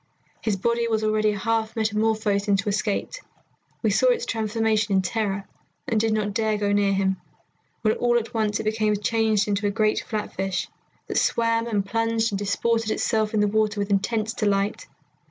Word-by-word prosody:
His 215 -3 0
body 235 +3 0
was 220 -1 0
already 215 0 +2
half 225 +2 -1
metamorphosed 215 -2 0
into 200 0 +1
a - - +2
skate. 205 - -2 0.6
We - - +3
saw - - +3
its 480 -2 +2
transformation 220 -2 0
in 190 - +3
terror, 200 -1 -2 0.4
and 225 - +1
did 225 0 +1
not 210 -1 0
dare 220 0 +1
to - - 0
go 205 -1 0
near 205 -1 +3
him, 190 -1 +1 0.7
when 215 -1 +3
all 240 0 +2
at 230 -1 -3
once 215 -2 0
it - - -3
became 215 -1 +1
changed 215 0 +1
into 205 0 0
a - - +2
great 215 +1 +1
flatfish, 195 -4 -3 0.4
that - - 0
swam 230 0 +1
and 205 -4 0
plunged 225 +1 0
and 195 - -2
disported 225 +2 0
itself 220 -1 0
in 210 - +3
the 210 - +3
water 215 0 +1
with 200 0 -2
intense 215 +3 0
delight. 200 -1 0
215 Hz, 185 wpm, -24 LUFS, 205-225 Hz, 0.7 s, We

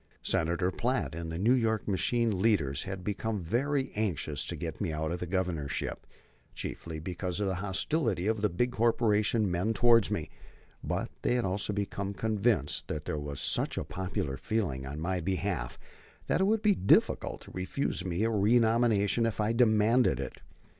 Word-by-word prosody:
Senator 85 +3 +1
Platt 125 -1 -1
and 85 0 -5
the 80 - -4
New 110 +8 +4
York 110 -4 +1
machine 105 +2 +1
leaders 80 -11 +2
had 95 -1 -5
become 105 0 -2
very 135 - 0
anxious 85 -8 -1
to - - -3
get - - -5
me - - 0
out 80 +1 -2
of 85 - -3
the 90 - -4
Governorship, 85 -6 -2 0.5
chiefly 80 -1 -5
because 90 +2 -3
of 105 - 0
the 95 - 0
hostility 105 - 0
of 110 -1 0
the 105 - +2
big 120 +8 0
corporation 110 -3 +2
men 95 +6 0
towards 115 -2 +5
me; - - -3 0.5
but - - -2
they 125 - +1
had 125 - +1
also 95 +2 -1
become 100 -1 -3
convinced 105 - 0
that 75 -1 -4
there 75 - -2
was 70 -1 -5
such - - 0
popular 90 -7 -3
feeling 70 -13 -2
on 70 +3 -5
my 90 +3 -1
behalf 90 -7 -2 0.5
that - - +1
it - - +4
would 215 +1 +1
be 210 -2 +5
difficult 100 - +2
to - - -13
refuse 95 +2 -2
me 90 +2 -1
a 115 - +2
renomination 115 0 +3
if 110 - -4
I 105 +2 +1
demanded 115 - +4
it. 70 - -5
100 Hz, 175 wpm, -30 LUFS, 85-115 Hz, 0.5 s, towards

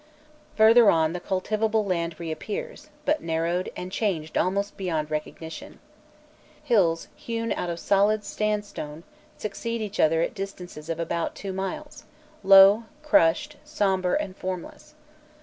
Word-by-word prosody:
Further 225 0 +7
on 160 -1 +3
the 180 - -3
cultivable 215 +4 0
land 170 -3 -2
reappears, 415 - -6 0.2
but 305 +2 +1
narrowed, 165 +2 -1
and 180 +1 -6
changed 175 -7 -2
almost 200 +3 0
beyond 160 -6 -2
recognition. 155 +1 -6 0.9
Hills, 190 - +2
hewn 230 -1 -4
out 175 - -2
of 170 - -3
solid 205 +2 +2
sandstone, 205 -8 -3 0.3
succeed 230 +3 -4
each 210 -2 -5
other 160 +1 +4
at - - -2
distances 180 -6 -7
of 165 0 -3
about 170 0 -2
two 195 -1 -5
miles, 190 0 -5 0.4
low, 195 +3 +7 0.2
crushed, 295 - +3
sombre, 195 -11 0
and 185 -2 -5
formless. 185 - -7
190 Hz, 130 wpm, -25 LUFS, 170-215 Hz, 0.9 s, Further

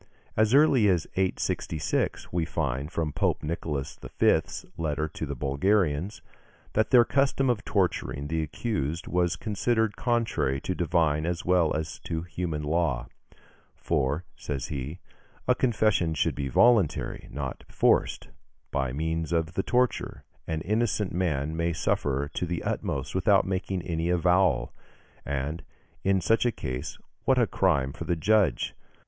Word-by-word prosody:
As 110 +3 +3
early 140 -7 +5
as 90 -4 +2
866, 90 -4 -1
we 85 -2 +1
find, 75 -2 -2
from 80 -4 -2
Pope - - 0
Nicholas 75 -3 -3 0.2
V.'s - - +2
letter 80 -2 -1
to 80 0 -6
the 70 - -4
Bulgarians, 80 - 0 0.5
that 110 0 +2
their 120 -2 +7
custom 135 -1 +2
of 115 -1 -3
torturing 90 -7 0
the 80 +2 -1
accused 80 - -2
was 90 -1 +1
considered 110 0 0
contrary 115 - 0
to 95 - -2
divine 80 -3 +1
as 85 -1 -2
well 90 -3 +3
as 80 +1 -4
to 80 0 -4
human 85 -3 -3
law: 75 -5 0 0.7
"For," 75 +1 -1
says 70 -4 -4
he, 70 +3 -4 0.5
"a - - +6
confession 105 -9 +1
should 70 - +1
be 70 -1 -3
voluntary, 110 - +3
and - - -13
not 65 -3 -4
forced. - - +2 0.4
By 65 -3 0
means 80 +3 -2
of 80 -1 0
the 95 - 0
torture, 125 +4 0 0.2
an 80 -1 -2
innocent 105 0 0
man 80 -4 -1
may 85 +1 0
suffer 70 -2 0
to 90 - -2
the 85 -1 -3
utmost - - -2
without 95 +1 +4
making 95 -1 -2
any 85 0 -1
avowal; 90 +2 +2 0.5
and, 70 +4 -2 0.4
in 95 -1 +2
such 115 +6 +3
a - - +2
case, 65 - -5 0.3
what 130 - +4
a 120 - +5
crime 70 -10 +1
for - - -7
the 85 - +1
judge! 95 - +2
85 Hz, 145 wpm, -27 LUFS, 75-100 Hz, 0.7 s, their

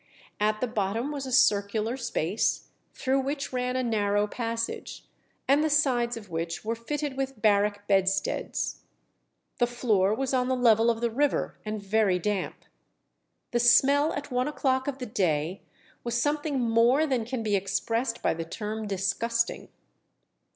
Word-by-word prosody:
At 215 +1 +1
the 250 - +1
bottom 225 +4 -2
was 280 -2 -4
a - - -5
circular 215 -2 +2
space, 230 -6 -1 0.2
through 265 +1 0
which 275 0 -3
ran 250 0 -1
a 255 - 0
narrow 205 -3 +1
passage, 230 +1 -4 0.4
and 285 +3 +4
the 315 - +1
sides 250 -5 +2
of 205 -5 -11
which 165 +3 -4
were 225 - 0
fitted 285 +4 -4
with 270 -3 -3
barrack 205 -1 +2
bedsteads. 195 0 0 0.8
The 240 - +3
floor 220 -5 +1
was 270 +2 -2
on 250 -1 +2
the 260 - +1
level 230 -2 +4
of 230 -1 0
the 235 -1 0
river, 285 +5 0
and 215 -1 -5
very 200 -2 +2
damp. 195 +1 -3 0.9
The 240 - +1
smell 280 +5 +5
at 285 -1 -6
one 250 +1 0
o'clock 260 -3 0
of 280 -2 -2
the 255 - -5
day 180 -5 -1 0.4
"was 235 0 -1
something 290 0 0
more 240 +5 +3
than 260 -6 0
can 240 0 -4
be 210 -2 +1
expressed 225 +5 -1
by - - +2
the 165 +1 -4
term 215 +5 -5
disgusting." 220 +4 -1
230 Hz, 160 wpm, -27 LUFS, 205-260 Hz, 0.9 s, smell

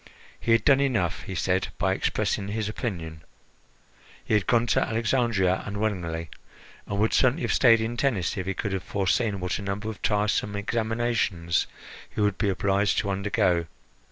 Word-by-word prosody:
He 115 - -1
had 115 -1 +4
done 140 -1 +6
enough, 115 -11 0
he - - -7
said, - - 0
by - - +1
expressing 100 - -1
his 105 +1 -2
opinion. 85 - -5 1.0
He - - -1
had 105 -3 +2
gone 120 -1 +3
to - - +2
Alexandria 110 -5 +1
unwillingly, 90 -6 -3 0.6
and 100 - -3
would 110 +2 +2
certainly 130 +5 +3
have - - +1
stayed 115 -3 +6
in 115 +2 -3
Tennis 115 -10 0
if 95 -1 -4
he 95 - -1
could 100 -3 -3
have 95 - -1
foreseen 100 +2 0
what 90 +2 -2
a - - -6
number 100 +2 -3
of 105 - -12
tiresome 105 0 0
examinations 110 -5 0 0.4
he - - -8
would 105 -2 +1
be 100 - +1
obliged 100 +1 +1
to 100 - 0
undergo. 95 -4 +1
105 Hz, 170 wpm, -26 LUFS, 95-115 Hz, 1.0 s, done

